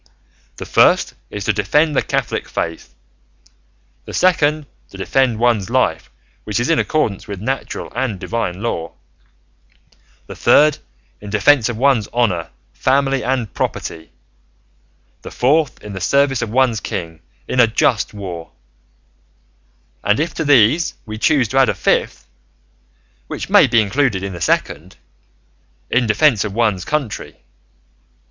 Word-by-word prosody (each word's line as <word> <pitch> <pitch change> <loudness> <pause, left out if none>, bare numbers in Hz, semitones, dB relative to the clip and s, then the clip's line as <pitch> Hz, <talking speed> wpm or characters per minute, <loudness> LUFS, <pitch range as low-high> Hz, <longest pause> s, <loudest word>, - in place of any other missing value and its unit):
The - - -7
first - - +3 0.2
is 105 -2 -6
to - - +2
defend 150 0 +1
the - - +3
Catholic - - -3
faith; 85 -5 -5 1.1
the - - -7
second, 155 -4 +2 0.2
to - - -12
defend 130 -4 +1
one's 115 -5 +1
life, - - 0 0.3
which 105 +1 -2
is 120 +7 0
in 165 - +3
accordance 115 -11 -1
with 100 -2 -6
natural 130 +6 -4
and 115 -8 -2
divine 105 -3 -3
law; 85 -8 -3 1.3
the - - -10
third, 150 0 +4 0.4
in 105 - -9
defence 115 +4 +3
of 120 - -4
one's 125 -4 +2
honour, 100 -9 -1 0.2
family, 135 - +1
and 125 -4 -2
property; 80 0 -4 1.1
the - - -9
fourth, 145 +3 +1
in 105 - -8
the 95 - -6
service 140 +5 +2
of 115 - -3
one's 120 -1 +2
king 80 -3 -6 0.3
in 130 - -2
a 120 - +6
just 115 0 +1
war; 90 -5 -8 1.5
and 105 +4 +2
if 160 +3 -1
to 160 - -3
these 145 +3 +3
we 110 -1 -7
choose 135 -2 +2
to 135 - +1
add 135 - +4
a - - -1
fifth - - -1 1.0
(which - - -6
may - - +7
be 115 -1 +3
included 110 -2 0
in 100 -1 -4
the 85 - -8
second), 85 +1 -1 1.0
in 120 -1 +2
defence 110 0 +3
of 105 -2 -5
one's 105 -6 0
country. 145 -8 -4
115 Hz, 140 wpm, -18 LUFS, 100-135 Hz, 1.5 s, may